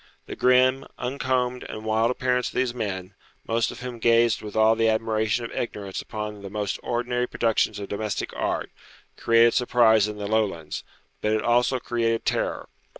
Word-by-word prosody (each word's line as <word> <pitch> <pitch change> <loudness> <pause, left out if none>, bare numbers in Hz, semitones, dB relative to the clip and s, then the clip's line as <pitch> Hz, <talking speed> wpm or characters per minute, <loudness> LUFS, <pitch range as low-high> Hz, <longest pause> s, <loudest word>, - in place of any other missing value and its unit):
The - - -7
grim, 130 +1 +3
uncombed, 125 -1 -1
and 110 0 -7
wild 110 +1 +2
appearance 125 0 0
of - - -14
these 125 -1 +1
men, 95 -5 -4 0.3
most 115 0 +1
of - - -9
whom 125 -2 -6
gazed 115 0 +3
with 105 -1 -8
all 110 +1 +5
the 115 0 +2
admiration 110 +1 0
of - - -7
ignorance 100 -5 -4
upon 105 -1 -6
the 100 - -7
most 105 -1 -3
ordinary 125 +1 -1
productions 115 -2 +1
of 100 -1 -6
domestic 105 0 -3
art, - - -2 0.4
created 115 0 +4
surprise 115 -4 +4
in 105 0 -6
the 105 - -5
Lowlands, 100 -7 -1 0.4
but 105 - +1
it 110 - 0
also 120 +2 +3
created 115 -1 -1
terror. - - -1
115 Hz, 170 wpm, -25 LUFS, 105-125 Hz, 0.4 s, all